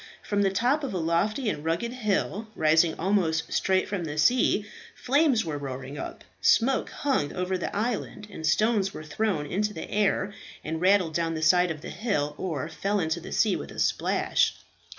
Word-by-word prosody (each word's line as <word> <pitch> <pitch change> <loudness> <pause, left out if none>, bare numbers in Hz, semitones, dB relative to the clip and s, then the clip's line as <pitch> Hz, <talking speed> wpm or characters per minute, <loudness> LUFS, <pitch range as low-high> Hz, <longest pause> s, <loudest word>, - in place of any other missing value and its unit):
From 205 -1 0
the 195 - +3
top 245 +10 +1
of 260 -8 -3
a - - 0
lofty 175 +9 0
and 150 -8 -2
rugged 170 +9 -1
hill, 215 -2 -1
rising 160 +1 +3
almost 165 -4 0
straight 190 -1 +2
from 200 -4 -3
the 150 -2 -5
sea, 210 +4 +3 0.3
flames 270 - +2
were 150 -3 -3
roaring 135 0 -6
up, - - -7 0.2
smoke 260 +3 +3
hung 260 - -1
over 180 0 -1
the 180 - -4
island, 215 -1 -2
and 160 - -8
stones 200 +4 +2
were 155 - -7
thrown 155 0 -1
into 210 +7 -1
the - - -6
air 205 -1 +1 0.3
and 160 +1 -4
rattled 185 -3 +3
down 165 0 -1
the 160 - -3
side 180 +3 +5
of 155 -2 -5
the - - -7
hill, 150 -11 -1
or 155 -7 -3
fell 195 +5 -1
into 160 -1 -1
the 170 - -9
sea 210 -3 +2
with - - -6
a - - -11
splash. - - +1
185 Hz, 190 wpm, -27 LUFS, 160-210 Hz, 0.3 s, side